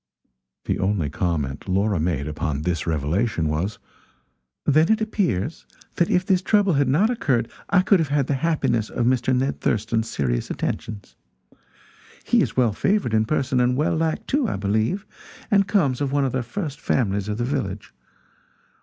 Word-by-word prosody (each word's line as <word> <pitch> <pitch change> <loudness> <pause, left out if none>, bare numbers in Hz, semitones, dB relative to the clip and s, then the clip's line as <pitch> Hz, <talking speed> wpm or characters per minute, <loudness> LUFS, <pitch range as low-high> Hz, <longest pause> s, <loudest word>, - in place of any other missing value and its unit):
The - - -1
only 95 -7 0
comment 75 -2 -2
Laura 100 0 +1
made 75 -3 -1
upon 75 -1 -3
this 85 -1 -2
revelation, 80 +4 0
was: 85 +7 -2 0.9
"Then 155 +6 +4
it 220 - +3
appears 165 - -1 0.3
that 170 - +2
if 180 +1 +2
this 185 -1 +2
trouble 200 -2 +3
had 140 -2 +2
not 180 - +3
occurred 130 - 0 0.2
I 185 -2 +4
could 195 0 +4
have 160 - +1
had 140 -2 +1
the 140 - -1
happiness 135 -7 0
of 120 - -1
Mr. 125 +1 +2
Ned 135 +2 -1
Thurston's 110 +1 0
serious - - -1
attentions. 105 -3 -4 1.1
He - - +3
is - - -2
well 120 -4 +3
favored 195 - 0
in 110 0 +3
person, 130 -1 0
and 125 +1 +2
well 155 +3 +1
liked, 160 +7 -1
too, 280 -3 +1
I - - -2
believe, 110 - 0 0.5
and 200 -1 +4
comes 145 - +1
of 140 -2 0
one 140 -1 +2
of 130 - -1
the 130 - -1
first 145 - -5
families 100 -5 0
of 105 0 -2
the 120 - -1
village. 100 -6 -3
125 Hz, 170 wpm, -23 LUFS, 100-160 Hz, 1.1 s, Then